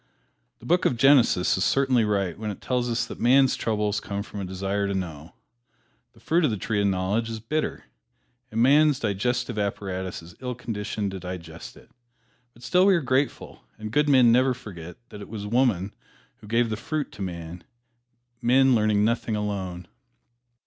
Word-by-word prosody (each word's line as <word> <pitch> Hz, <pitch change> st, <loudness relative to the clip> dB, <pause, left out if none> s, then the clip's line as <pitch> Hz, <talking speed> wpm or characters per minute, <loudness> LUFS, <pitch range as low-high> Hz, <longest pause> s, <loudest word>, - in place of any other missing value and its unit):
The -, -, -16 dB
book 175 Hz, +8 st, +2 dB
of 120 Hz, -, +2 dB
Genesis 125 Hz, -8 st, +4 dB
is -, -, +1 dB
certainly 135 Hz, -4 st, +2 dB
right 100 Hz, -5 st, 0 dB
when 110 Hz, 0 st, -5 dB
it 100 Hz, -, -6 dB
tells 125 Hz, -1 st, -1 dB
us 120 Hz, +1 st, 0 dB
that -, -, -9 dB
man's 130 Hz, +2 st, +4 dB
troubles 105 Hz, -1 st, -1 dB
came 100 Hz, -1 st, -4 dB
from 105 Hz, -, -9 dB
a -, -, -4 dB
desire 95 Hz, +2 st, -2 dB
to 100 Hz, -, -2 dB
know. 80 Hz, -4 st, -6 dB, 0.8 s
The -, -, -21 dB
fruit 170 Hz, +3 st, +1 dB
of 150 Hz, -, +3 dB
the 110 Hz, -, -2 dB
tree 105 Hz, +1 st, -1 dB
of 100 Hz, -, +2 dB
knowledge 100 Hz, +4 st, 0 dB
is 110 Hz, -1 st, -5 dB
bitter, 150 Hz, +8 st, -3 dB, 0.7 s
and 115 Hz, +1 st, +1 dB
man's 145 Hz, +1 st, +5 dB
digestive 120 Hz, +1 st, -1 dB
apparatus 95 Hz, -3 st, -3 dB
is 85 Hz, +1 st, -13 dB
ill 125 Hz, -1 st, -4 dB
conditioned 105 Hz, -3 st, -4 dB
to 95 Hz, -, -6 dB
digest 85 Hz, -3 st, -8 dB
it. -, -, -19 dB, 0.6 s
But 120 Hz, -, -18 dB
still 180 Hz, +6 st, +3 dB
we 195 Hz, -, +6 dB
are 170 Hz, -, +1 dB
grateful, 135 Hz, +1 st, -2 dB
and 110 Hz, 0 st, -7 dB
good 150 Hz, +4 st, +2 dB
men 130 Hz, -4 st, +6 dB
never 130 Hz, +2 st, +3 dB
forget 90 Hz, -9 st, -10 dB
that 105 Hz, -, -10 dB
it -, -, -10 dB
was 105 Hz, -2 st, -6 dB
woman 105 Hz, -4 st, +1 dB, 0.4 s
who -, -, -15 dB
gave 115 Hz, +1 st, +1 dB
the 110 Hz, -, -2 dB
fruit 150 Hz, +5 st, -3 dB
to -, -, -11 dB
man 85 Hz, -2 st, -6 dB, 0.8 s
men 130 Hz, +2 st, +4 dB
learn 105 Hz, -2 st, +2 dB
nothing 115 Hz, -1 st, 0 dB
alone. 95 Hz, -4 st, -4 dB
110 Hz, 185 wpm, -25 LUFS, 95-125 Hz, 0.8 s, we